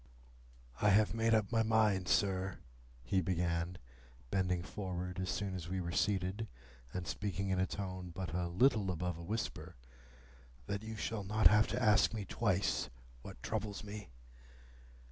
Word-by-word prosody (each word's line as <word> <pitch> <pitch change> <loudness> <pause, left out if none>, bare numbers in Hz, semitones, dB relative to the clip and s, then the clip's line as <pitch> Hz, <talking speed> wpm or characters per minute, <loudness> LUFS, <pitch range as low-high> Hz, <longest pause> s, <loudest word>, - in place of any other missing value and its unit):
"I 105 - +5
have 105 +1 +5
made 115 0 +3
up 110 -1 +1
my 115 -2 +3
mind, 110 -4 +3
sir," 95 -1 +1 0.5
he 95 +10 +1
began, 85 0 -1 0.5
bending 90 -2 +1
forward 90 -2 -4
as 95 -1 -2
soon 100 +1 -2
as 85 -2 -5
we 95 +1 -1
were 85 -1 -3
seated, 100 +2 0 0.4
and 90 -1 -4
speaking 95 -1 -2
in 95 -1 +1
a 95 - +2
tone 95 -2 -5
but 90 0 -5
a 90 0 0
little 105 +2 +3
above 90 -1 -2
a - - -7
whisper, 110 +6 -4 0.9
"that 100 0 -3
you 110 0 -6
shall 110 -1 -3
not 110 +3 0
have 105 +1 +7
to - - -1
ask 105 +1 +4
me 105 -2 -3
twice 100 -1 0 0.3
what - - -10
troubles 105 -1 -3
me. 105 -4 -7
95 Hz, 160 wpm, -35 LUFS, 90-105 Hz, 0.9 s, have